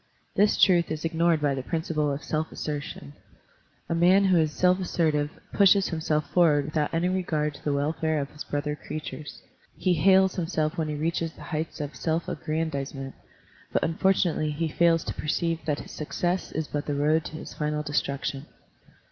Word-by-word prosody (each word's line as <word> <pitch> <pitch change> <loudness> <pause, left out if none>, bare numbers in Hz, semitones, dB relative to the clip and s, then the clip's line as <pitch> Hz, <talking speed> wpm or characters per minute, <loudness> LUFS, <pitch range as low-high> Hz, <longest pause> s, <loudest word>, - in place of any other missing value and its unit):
This 205 +1 +3
truth 175 -3 +5
is 155 0 -3
ignored 165 0 +2
by 145 -2 +2
the 135 - -3
principle 155 0 -1
of 140 +2 -4
self 155 +1 -2
assertion. 145 - -5 0.7
A - - -1
man 180 +4 +5
who 185 -2 +4
is 155 -2 +2
self 180 +4 +3
assertive 155 -5 +1 0.2
pushes 200 -1 +5
himself 155 -2 -1
forward 155 -5 +4
without 150 0 -1
any 170 +2 +1
regard 160 -5 0
to - - -14
the 145 - 0
welfare 155 +2 0
of 140 0 -4
his 150 - -8
brother 145 0 -2
creatures; 150 0 -7 0.3
he 185 - +2
hails 190 +3 +4
him 165 - -1
self 155 -2 -1
when 160 -2 -1
he 150 - -3
reaches 165 +1 -1
the - - -12
heights 160 0 -4
of 145 -1 -5
self 165 0 -1
aggran 160 +1 -2
dizement; 135 -1 -5 0.6
but - - +1
unfortunately 170 -2 +1
he 160 +2 -2
fails 165 +1 +3
to - - -4
perceive 165 +2 -1
that 145 -2 0
his - - -11
success 175 +4 -2
is 160 -1 -3
but 145 -1 -4
the 145 - -1
road 155 +3 +2
to - - -7
his 155 - -8
final 150 0 -2
destruction. 140 -1 -2
155 Hz, 185 wpm, -26 LUFS, 150-170 Hz, 0.7 s, truth